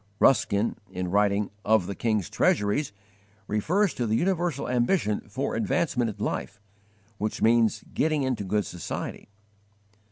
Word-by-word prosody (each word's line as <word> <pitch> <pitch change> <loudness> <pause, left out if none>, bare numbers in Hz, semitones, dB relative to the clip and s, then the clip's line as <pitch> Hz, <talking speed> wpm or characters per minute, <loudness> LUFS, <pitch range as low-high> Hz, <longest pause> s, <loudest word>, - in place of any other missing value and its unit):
Ruskin, 105 -4 +3
in 90 -1 -4
writing 100 0 +2
"Of 110 -3 +3
the 100 - -4
King's 110 -4 0
Treasuries," 105 +6 +1 0.5
refers 170 - +1
to 120 - -2
the 110 - +1
universal 175 0 0
ambition 120 - +1
for 130 +6 -2
'advancement 165 - 0
in - - -2
life,' - - -4 0.6
which 105 +1 -2
means 115 -1 +3
'getting 155 -2 +1
into 130 -5 -1
good 105 +2 0
society.' 90 +3 -6
110 Hz, 130 wpm, -26 LUFS, 100-140 Hz, 0.6 s, Ruskin